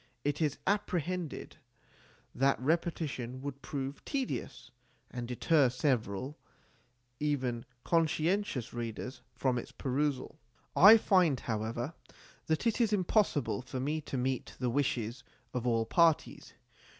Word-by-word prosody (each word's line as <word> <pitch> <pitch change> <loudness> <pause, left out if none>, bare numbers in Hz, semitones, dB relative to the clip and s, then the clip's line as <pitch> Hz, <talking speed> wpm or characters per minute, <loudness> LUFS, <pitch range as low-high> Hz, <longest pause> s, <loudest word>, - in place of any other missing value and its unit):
It 145 +2 -1
is 150 -3 +1
apprehended 180 -4 -2 0.8
that 135 +1 +2
repetition 145 -4 -1
would 140 -1 -5
prove 140 0 -5
tedious, 250 - -4 0.4
and 120 -2 -5
deter 135 +3 +3
several 125 0 -1 0.8
even 130 -6 -1 0.2
con 165 -1 +3
scientious 160 - -1
readers 120 +3 -5
from 125 0 +1
its - - -9
perusal. 140 +1 -2 0.4
I 210 +5 +10
find, 180 - +3
however, 115 +5 -3 0.5
that 160 +7 0
it 230 +1 +2
is 225 -3 +3
impossible 185 - +1
for 130 +1 -5
me 150 +4 -1
to 140 - -5
meet 130 0 -2
the 125 -2 -1
wishes 120 -3 -1 0.3
of 125 -1 -2
all 115 -2 +2
parties. 165 +3 +2
140 Hz, 120 wpm, -32 LUFS, 125-165 Hz, 0.8 s, I